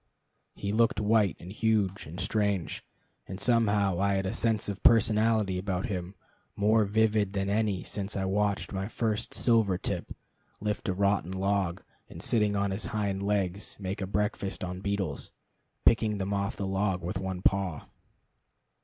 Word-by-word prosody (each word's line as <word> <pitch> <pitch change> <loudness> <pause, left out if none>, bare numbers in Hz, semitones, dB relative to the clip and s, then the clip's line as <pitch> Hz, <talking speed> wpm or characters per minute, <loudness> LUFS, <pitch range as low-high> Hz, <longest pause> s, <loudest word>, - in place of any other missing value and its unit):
He 100 - -3
looked 115 -1 +2
white, 105 -2 +2
and 90 - -9
huge, 105 -4 0
and 85 +4 -8
strange; 100 -6 -1 0.4
and 95 - -6
somehow 100 -6 +2
I 100 0 +2
had 95 0 -1
a 95 - -1
sense 115 -2 +1
of 100 -2 -4
personality 110 -4 +4
about 95 -1 -2
him 95 -4 -4 0.4
more 110 +1 +3
vivid 105 -1 +2
than 100 0 -1
any 105 -3 0
since 100 0 -3
I 95 - -1
watched 100 +1 0
my 95 0 -2
first 110 -1 -2
silver 110 -6 +3
tip - - -4 0.5
lift 105 -1 -2
a - - +1
rotten 100 -2 +1
log, 95 -1 0 0.3
and, - - -10
sitting 105 -3 +2
on 100 0 0
his 95 +3 -2
hind 100 -3 -2
legs, 100 -1 -1
make 95 +1 -4
a 95 - -2
breakfast 100 -1 -2
on 90 0 -5
beetles, 100 -1 -2 0.5
picking 110 -2 +4
them 100 +1 -2
off 100 0 -1
the 100 - -3
log 95 -2 0
with 90 +2 -3
one 95 -1 -4
paw. 95 -6 +1
100 Hz, 160 wpm, -29 LUFS, 95-105 Hz, 0.5 s, personality